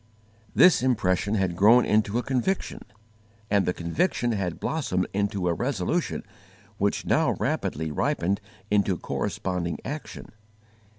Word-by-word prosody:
This 180 -7 +6
impression 105 -5 +1
had 95 -4 0
grown 115 +7 +6
into 105 +1 +2
a 120 - 0
conviction, 135 +9 -1 0.7
and 100 -3 +3
the - - +3
conviction 120 - -1
had 95 -6 -2
blossomed 95 -13 -1
into 100 -2 -1
a 85 - +2
resolution 125 - -1 0.6
which 100 +1 0
now - - +2
rapidly 80 +1 -2
ripened 95 +6 0 0.3
into 100 -3 +2
corresponding 90 -1 -3
action. 150 +2 -7
100 Hz, 120 wpm, -26 LUFS, 90-125 Hz, 0.7 s, This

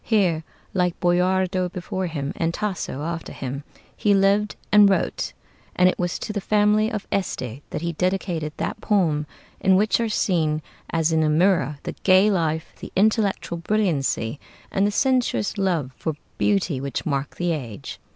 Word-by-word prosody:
Here, 180 -8 +2 0.3
like 180 -2 0
Boiardo 185 +1 +2
before 185 +1 -3
him 145 -4 -3
and 165 0 -1
Tasso 190 -9 -3
after 165 +1 -4
him, 135 +2 -5 0.3
he 205 -1 +3
lived 200 +2 +3 0.2
and 210 -1 +7
wrote; 195 - 0 0.4
and 180 - +5
it 185 - +1
was 175 -1 -1
to 215 - -5
the 205 - -2
family 210 +2 +3
of 210 -2 -4
Este 130 - -2
that 155 - -4
he 170 0 -1
dedicated 180 -3 -1
that 215 - -3
poem 160 -8 +1 0.3
in 190 -1 +4
which 210 +4 +3
are 230 -1 0
seen, 155 -7 +1 0.3
as 165 -1 +1
in 160 0 +3
a 155 - +2
mirror, 155 -3 +2
the - - -4
gay 190 +2 +5
life, 160 -3 -1
the - - -8
intellectual 200 -4 +1
brilliancy, 160 - 0 0.3
and 195 +1 +2
the - - 0
sensuous 250 -3 +1
love 170 -9 0
for 160 - -3 0.3
beauty 180 -9 +1
which 140 -2 -3
mark 140 -2 -2
the 175 0 0
age. 120 - -5
180 Hz, 165 wpm, -23 LUFS, 155-200 Hz, 0.4 s, and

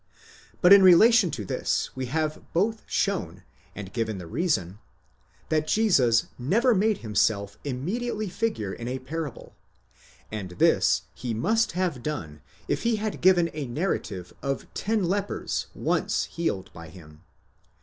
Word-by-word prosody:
But 180 +1 +8
in 200 - +9
relation 190 +3 +7
to 105 -9 -5
this - - -2
we 130 -1 -4
have 155 +3 -2
both 215 +6 +1
shown, 200 -2 -1 0.3
and 100 -2 -8
given 110 -3 -2
the 90 - -7
reason, 105 - -1 0.7
that 155 -1 +1
Jesus 140 - +3
never 230 - +3
made 210 +1 +2
himself 105 -1 0
immediately 205 - -3
figure 180 - -2
in 120 - -7
a 130 +1 -2
parable, 145 0 -6 0.8
and 105 -4 -5
this - - +3
he 120 -3 -4
must 225 - +1
have 175 -8 -1
done 80 - -5 0.3
if - - -1
he 235 -1 +1
had 215 0 -4
given 175 -2 +4
a 150 -3 -4
narrative 120 - -3
of 140 -1 -3
ten 215 -1 0
lepers 195 +3 -2
once - - 0
healed 130 - -3
by 85 -1 -10
him. 80 -3 -15
155 Hz, 140 wpm, -26 LUFS, -, 0.8 s, in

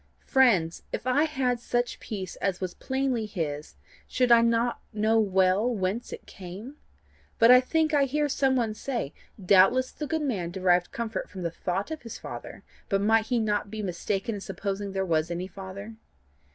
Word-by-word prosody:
Friends, 205 - +3
if - - -4
I 280 +4 +3
had 260 -5 0
such 240 0 -1
peace 195 -5 -6
as 190 -2 -1
was 185 -2 -3
plainly 265 -4 -1
his, 150 - -4 0.3
should 250 -1 +1
I 235 -1 +8
not 235 +1 +1
know 220 +1 +2
well 190 +2 +3
whence 210 0 -2
it - - -8
came? 200 +9 -9 0.6
But 230 +1 +7
I 250 0 +9
think 315 +4 +1
I 285 -2 +4
hear 295 +2 0
some 265 -1 +1
one 230 -4 0
say: 235 - -4 0.3
'Doubtless 195 +7 +4
the 300 - -5
good 320 0 -1
man 200 -12 -1
derived 180 -1 +2
comfort 225 -3 -4
from 185 -3 -7
the 170 - -1
thought 185 - -3
of 315 - -5
his 230 - -8
Father, - - -8 0.3
but 195 - +2
might 220 +2 +3
he 245 - +1
not 210 -2 0
be 215 0 -5
mistaken 195 +4 -2
in 205 - -5
supposing 200 0 -4
there 190 0 -1
was 160 -2 +1
any 175 +1 -3
Father? 195 +3 -8
215 Hz, 180 wpm, -27 LUFS, 190-250 Hz, 0.6 s, I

